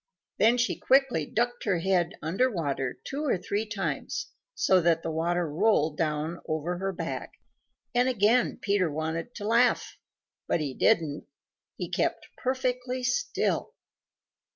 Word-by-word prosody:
Then 235 Hz, +3 st, +5 dB
she 235 Hz, 0 st, 0 dB
quickly 265 Hz, -, +3 dB
ducked 240 Hz, +1 st, -1 dB
her 195 Hz, -4 st, +2 dB
head 175 Hz, -1 st, +1 dB
under 190 Hz, +12 st, +2 dB
water 140 Hz, -, -2 dB
two 285 Hz, +3 st, -4 dB
or 275 Hz, -10 st, +1 dB
three 205 Hz, +4 st, -2 dB
times 210 Hz, -2 st, -3 dB, 0.2 s
so 185 Hz, -1 st, +4 dB
that 165 Hz, -1 st, +2 dB
the 165 Hz, -, -2 dB
water 170 Hz, +2 st, 0 dB
rolled 160 Hz, -2 st, +2 dB
down 155 Hz, +1 st, -1 dB
over 160 Hz, +3 st, -2 dB
her 195 Hz, +1 st, -1 dB
back, 185 Hz, -, -5 dB, 0.6 s
and 245 Hz, +1 st, +3 dB
again 235 Hz, +1 st, +3 dB
Peter 200 Hz, -5 st, +1 dB
wanted 160 Hz, +7 st, -3 dB
to 205 Hz, -2 st, -5 dB
laugh. 235 Hz, +2 st, +2 dB, 0.5 s
But -, -, +1 dB
he 145 Hz, -4 st, -2 dB
didn't. 150 Hz, +1 st, +1 dB, 0.5 s
He -, -, -3 dB
kept -, -, -1 dB
perfectly 255 Hz, 0 st, -2 dB
still. 455 Hz, -, 0 dB
190 Hz, 140 wpm, -28 LUFS, 160-245 Hz, 0.6 s, Then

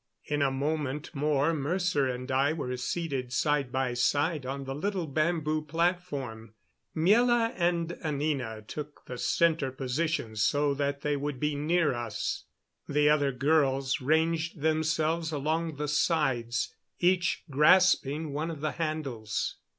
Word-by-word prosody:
In 150 Hz, -1 st, -1 dB
a 140 Hz, -, +3 dB
moment 145 Hz, +1 st, -2 dB
more 150 Hz, +1 st, +1 dB
Mercer 155 Hz, -1 st, 0 dB
and 125 Hz, +1 st, -4 dB
I 135 Hz, +3 st, +2 dB
were 125 Hz, -6 st, -3 dB
seated 130 Hz, 0 st, -3 dB
side 140 Hz, 0 st, +1 dB
by 130 Hz, -1 st, 0 dB
side 145 Hz, +3 st, +1 dB
on 135 Hz, +1 st, -4 dB
the 135 Hz, 0 st, -4 dB
little 185 Hz, +4 st, -2 dB
bamboo 155 Hz, +1 st, 0 dB
platform. 150 Hz, -, -2 dB, 0.4 s
Miela 230 Hz, +7 st, +4 dB
and 170 Hz, -1 st, 0 dB
Anina 140 Hz, -8 st, -2 dB
took 150 Hz, +6 st, -8 dB
the 125 Hz, -1 st, -7 dB
center 160 Hz, -5 st, +2 dB
positions 130 Hz, -4 st, -2 dB
so 145 Hz, +5 st, +2 dB
that 140 Hz, 0 st, -2 dB
they 145 Hz, 0 st, 0 dB
would 145 Hz, -2 st, -3 dB
be 150 Hz, +1 st, 0 dB
near 155 Hz, +1 st, +1 dB
us. 120 Hz, -3 st, -3 dB, 0.4 s
The 150 Hz, 0 st, +3 dB
other 145 Hz, -2 st, +3 dB
girls 135 Hz, -1 st, +1 dB
ranged 160 Hz, +2 st, +1 dB
themselves 160 Hz, +1 st, +1 dB
along 160 Hz, +2 st, -1 dB
the 150 Hz, +1 st, -3 dB
sides, 135 Hz, -6 st, 0 dB, 0.3 s
each 180 Hz, 0 st, +2 dB
grasping 150 Hz, -1 st, +4 dB
one 155 Hz, +3 st, -2 dB
of 155 Hz, -4 st, -6 dB
the 155 Hz, -1 st, 0 dB
handles. 140 Hz, -11 st, -3 dB
150 Hz, 135 wpm, -29 LUFS, 135-160 Hz, 0.4 s, Miela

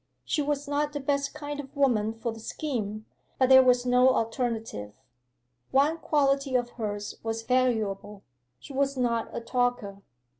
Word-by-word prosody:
She 305 Hz, -, 0 dB
was 290 Hz, 0 st, -2 dB
not 290 Hz, +1 st, -1 dB
the 290 Hz, -, -3 dB
best 280 Hz, 0 st, -1 dB
kind 290 Hz, -1 st, -5 dB
of 280 Hz, 0 st, -9 dB
woman 230 Hz, -6 st, +2 dB
for 230 Hz, +1 st, -3 dB
the 225 Hz, -, -10 dB
scheme; 215 Hz, -5 st, -4 dB, 0.3 s
but 260 Hz, -1 st, +3 dB
there 260 Hz, 0 st, +9 dB
was 250 Hz, -1 st, +3 dB
no 250 Hz, +1 st, +5 dB
alternative. 225 Hz, -, -2 dB, 0.8 s
One 295 Hz, +5 st, +2 dB
quality 275 Hz, -3 st, +1 dB
of 245 Hz, -1 st, +1 dB
hers 205 Hz, -3 st, -5 dB
was 225 Hz, 0 st, -3 dB
valuable; 220 Hz, -5 st, 0 dB, 0.4 s
she 280 Hz, -, -11 dB
was 275 Hz, 0 st, 0 dB
not 235 Hz, -2 st, 0 dB
a -, -, -5 dB
talker. 240 Hz, -5 st, -1 dB
250 Hz, 155 wpm, -27 LUFS, 225-280 Hz, 0.8 s, there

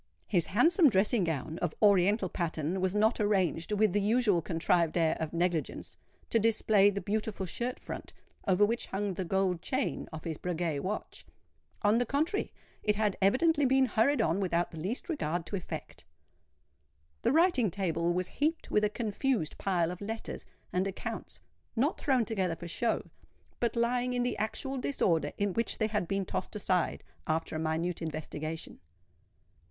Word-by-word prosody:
His 175 Hz, -6 st, +1 dB
handsome 320 Hz, -, +5 dB
dressing 205 Hz, 0 st, +3 dB
gown 160 Hz, +1 st, -3 dB
of 175 Hz, -3 st, -2 dB
oriental 200 Hz, 0 st, +4 dB
pattern 170 Hz, +1 st, -2 dB
was 190 Hz, +1 st, 0 dB
not 220 Hz, +3 st, +3 dB
arranged, 190 Hz, -4 st, +1 dB
with 210 Hz, -2 st, +3 dB
the 205 Hz, -, +2 dB
usual 210 Hz, -4 st, +3 dB
contrived 165 Hz, 0 st, +1 dB
air 165 Hz, -2 st, +3 dB
of 160 Hz, -1 st, -3 dB
negligence, 170 Hz, -2 st, -2 dB, 0.4 s
to 230 Hz, -, +4 dB
display 215 Hz, -2 st, +4 dB
the 200 Hz, 0 st, -2 dB
beautiful 210 Hz, 0 st, -2 dB
shirt 245 Hz, +8 st, -3 dB
front, -, -, -7 dB, 0.4 s
over 195 Hz, +2 st, +5 dB
which 230 Hz, +3 st, -1 dB
hung 195 Hz, 0 st, -2 dB
the 185 Hz, -, -3 dB
gold 185 Hz, -1 st, 0 dB
chain 260 Hz, +5 st, -2 dB
of 155 Hz, -1 st, -7 dB
his 160 Hz, -2 st, -4 dB
Breguet 170 Hz, -4 st, -2 dB
watch:—on 210 Hz, +2 st, -3 dB
the 245 Hz, -, +1 dB
contrary, 315 Hz, +9 st, 0 dB, 0.3 s
it 210 Hz, -1 st, +1 dB
had 210 Hz, -2 st, +1 dB
evidently 290 Hz, -, +3 dB
been 265 Hz, 0 st, +4 dB
hurried 235 Hz, +2 st, +2 dB
on 165 Hz, +2 st, +1 dB
without 175 Hz, -3 st, 0 dB
the 160 Hz, -, -8 dB
least 200 Hz, -, -3 dB
regard 175 Hz, -, -2 dB
to 200 Hz, -, -4 dB
effect. 185 Hz, -, -7 dB, 1.2 s
The -, -, +2 dB
writing 315 Hz, -, +4 dB
table 170 Hz, -2 st, 0 dB
was 180 Hz, +1 st, +1 dB
heaped 315 Hz, -, -1 dB
with 210 Hz, -, +3 dB
a 210 Hz, -, +3 dB
confused 220 Hz, -, -1 dB
pile 175 Hz, -3 st, +1 dB
of 180 Hz, -, -8 dB
letters 225 Hz, +2 st, -5 dB, 0.3 s
and 185 Hz, +2 st, +1 dB
accounts—not 240 Hz, -, -4 dB
thrown 260 Hz, -5 st, +2 dB
together 190 Hz, -5 st, -1 dB
for 170 Hz, -, -8 dB
show, 225 Hz, +7 st, 0 dB, 0.6 s
but 235 Hz, 0 st, 0 dB
lying 245 Hz, +1 st, +1 dB
in 245 Hz, 0 st, +1 dB
the 245 Hz, -1 st, -1 dB
actual 265 Hz, +5 st, -2 dB
disorder 165 Hz, -, +1 dB
in 200 Hz, -2 st, 0 dB
which 230 Hz, +3 st, 0 dB
they 220 Hz, -, +1 dB
had 210 Hz, -5 st, -1 dB
been 195 Hz, +1 st, -1 dB
tossed 185 Hz, -, -4 dB
aside 185 Hz, -4 st, 0 dB, 0.2 s
after 160 Hz, 0 st, -1 dB
a -, -, -1 dB
minute 160 Hz, +2 st, -1 dB
investigation. 155 Hz, 0 st, -5 dB
200 Hz, 165 wpm, -30 LUFS, 170-230 Hz, 1.2 s, handsome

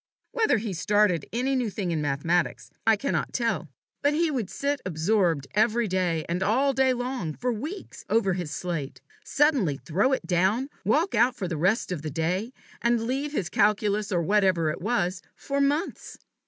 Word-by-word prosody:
Whether 440 Hz, -, +2 dB
he 215 Hz, -2 st, -3 dB
started 195 Hz, -2 st, +2 dB
any 255 Hz, +4 st, 0 dB
new 250 Hz, -4 st, 0 dB
thing 190 Hz, -3 st, -3 dB
in 160 Hz, -2 st, -1 dB
mathematics 150 Hz, +5 st, -1 dB, 0.2 s
I 225 Hz, -, +6 dB
cannot 275 Hz, +7 st, -2 dB
tell, 230 Hz, -, -1 dB, 0.3 s
but 285 Hz, +1 st, +2 dB
he 330 Hz, 0 st, +2 dB
would 235 Hz, -9 st, -2 dB
sit 280 Hz, +8 st, -2 dB
absorbed, 170 Hz, -3 st, +1 dB
every 220 Hz, +2 st, +2 dB
day 180 Hz, -4 st, 0 dB
and 175 Hz, +2 st, -2 dB
all 260 Hz, +8 st, +2 dB
day 265 Hz, 0 st, +3 dB
long, 245 Hz, -, -3 dB
for 250 Hz, 0 st, -1 dB
weeks, 310 Hz, -, -7 dB
over 195 Hz, -4 st, +2 dB
his 175 Hz, -3 st, -4 dB
slate, 160 Hz, -5 st, -4 dB, 0.2 s
suddenly 270 Hz, -, +2 dB
throw 190 Hz, -, 0 dB
it -, -, -1 dB
down, 195 Hz, +9 st, +1 dB
walk 335 Hz, +6 st, +2 dB
out 235 Hz, +3 st, +3 dB
for 190 Hz, -, -3 dB
the 170 Hz, -, -3 dB
rest 185 Hz, +7 st, +1 dB
of 175 Hz, -5 st, -3 dB
the 155 Hz, -, -4 dB
day, 175 Hz, -, -1 dB, 0.3 s
and 235 Hz, -1 st, +1 dB
leave 275 Hz, +4 st, -2 dB
his 205 Hz, -, -2 dB
calculus, 210 Hz, +1 st, +1 dB
or 175 Hz, -3 st, +1 dB
whatever 185 Hz, -4 st, +2 dB
it -, -, -7 dB
was, 185 Hz, -4 st, 0 dB
for 280 Hz, 0 st, -2 dB
months. 290 Hz, +6 st, -1 dB
210 Hz, 180 wpm, -26 LUFS, 175-255 Hz, 0.3 s, I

